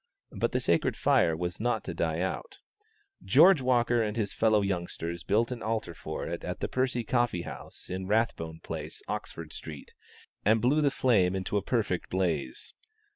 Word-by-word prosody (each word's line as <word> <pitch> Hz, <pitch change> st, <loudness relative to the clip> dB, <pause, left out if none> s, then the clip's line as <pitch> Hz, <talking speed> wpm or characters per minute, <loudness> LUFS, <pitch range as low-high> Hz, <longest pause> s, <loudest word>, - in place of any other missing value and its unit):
But -, -, -1 dB
the -, -, +1 dB
sacred -, -, +1 dB
fire 80 Hz, -1 st, +3 dB
was 90 Hz, +1 st, -3 dB
not 120 Hz, +3 st, 0 dB
to -, -, -5 dB
die -, -, -1 dB
out: -, -, -3 dB, 0.7 s
George 185 Hz, -6 st, +6 dB
Walker 120 Hz, -2 st, +3 dB
and 105 Hz, 0 st, -2 dB
his 105 Hz, -3 st, -1 dB
fellow 110 Hz, -2 st, +3 dB
youngsters 85 Hz, -3 st, -3 dB
built 115 Hz, +4 st, +2 dB
an 120 Hz, -2 st, -5 dB
altar 110 Hz, -5 st, -2 dB
for 80 Hz, -1 st, -5 dB
it 85 Hz, +1 st, -4 dB
at 90 Hz, 0 st, -4 dB
the -, -, -1 dB
Percy 130 Hz, -2 st, 0 dB
Coffee 120 Hz, -7 st, +1 dB
House -, -, -9 dB
in 95 Hz, +1 st, -4 dB
Rathbone 90 Hz, -7 st, 0 dB
Place, -, -, -6 dB
Oxford 80 Hz, -2 st, -5 dB
Street, 75 Hz, -3 st, -8 dB, 0.5 s
and 110 Hz, +2 st, +4 dB
blew 135 Hz, +7 st, +3 dB
the 145 Hz, -, +4 dB
flame 100 Hz, -9 st, +3 dB
into 95 Hz, +2 st, -3 dB
a 100 Hz, -, +3 dB
perfect 100 Hz, -4 st, -1 dB
blaze. 85 Hz, -8 st, -1 dB
105 Hz, 175 wpm, -29 LUFS, 85-120 Hz, 0.7 s, George